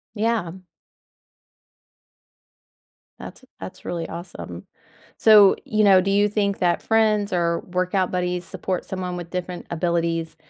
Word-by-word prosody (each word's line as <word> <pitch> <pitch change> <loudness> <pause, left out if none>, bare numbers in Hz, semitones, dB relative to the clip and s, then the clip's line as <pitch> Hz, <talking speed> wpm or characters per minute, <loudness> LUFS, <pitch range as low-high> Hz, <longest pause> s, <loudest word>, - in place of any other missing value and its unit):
Yeah. 215 -5 -1 2.7
That's - - -11 0.2
that's - - -9
really 170 -2 -4
awesome. 170 +2 -9 0.5
So, 210 -3 +7
you 215 -1 +1
know, 195 -2 +6
do 195 +2 -1
you 205 +1 +3
think 200 -1 -1
that 175 -1 +1
friends 215 -3 +1
or 170 -1 0
workout 185 +1 -1
buddies 180 -1 -2
support 185 -2 -4
someone 185 -1 -5
with 175 -1 -8
different 180 -1 -5
abilities, 165 -1 -1
180 Hz, 120 wpm, -22 LUFS, 175-205 Hz, 2.7 s, So